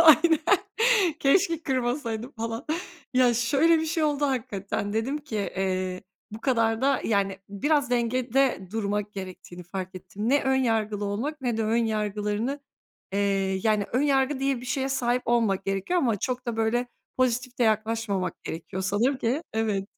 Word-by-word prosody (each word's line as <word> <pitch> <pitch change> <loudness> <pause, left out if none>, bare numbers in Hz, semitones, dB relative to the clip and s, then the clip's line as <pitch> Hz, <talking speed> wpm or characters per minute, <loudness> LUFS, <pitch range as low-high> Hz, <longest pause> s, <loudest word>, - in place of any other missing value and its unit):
aynen, 320 0 +7 0.8
keşke 330 +3 +3
kırmasaydım 245 -3 -2
falan. 230 +2 -4 0.5
Ya 250 -1 +5
şöyle 280 +8 +3
bir 320 - -1
şey 320 0 0
oldu; 290 -1 +1
hakikaten 205 -6 -2
dedim 235 +7 -1
ki, 290 -7 -6
eee, 185 -2 -2 0.3
bu 215 +1 -8
kadar 230 -3 +1
da 275 +1 +2
yani 195 -3 +1
biraz 280 +6 +1
dengede 245 -2 +1
durmak 210 -1 -2
gerektiğini 185 -2 -8
fark 185 +1 -6
ettim. 205 +4 -5
Ne 285 +3 +3
ön 265 0 +2
yargılı 220 -5 0
olmak 250 +10 -3
ne 245 -4 -1
de 225 - 0
ön 230 +2 +2
yargılarını, 215 +5 -1 0.5
eee, 195 -1 +1
yani 215 -2 +2
ön 255 +4 +2
yargı 270 -1 +2
diye 270 -2 0
bir 250 - -9
şeye 265 +2 -1
sahip 250 -2 0
olmamak 225 -5 +2
gerekiyor 195 - 0
ama 235 -9 +2
çok 250 +4 -3
da 235 -2 -2
böyle 225 +2 +1 0.3
pozitif 255 0 0
de - - +2
yaklaşmamak 220 -3 0
gerekiyor 175 +3 -5
sanırım 215 +8 +1
ki, 260 +6 0
evet. 215 -3 0
230 Hz, 155 wpm, -26 LUFS, 205-265 Hz, 0.8 s, aynen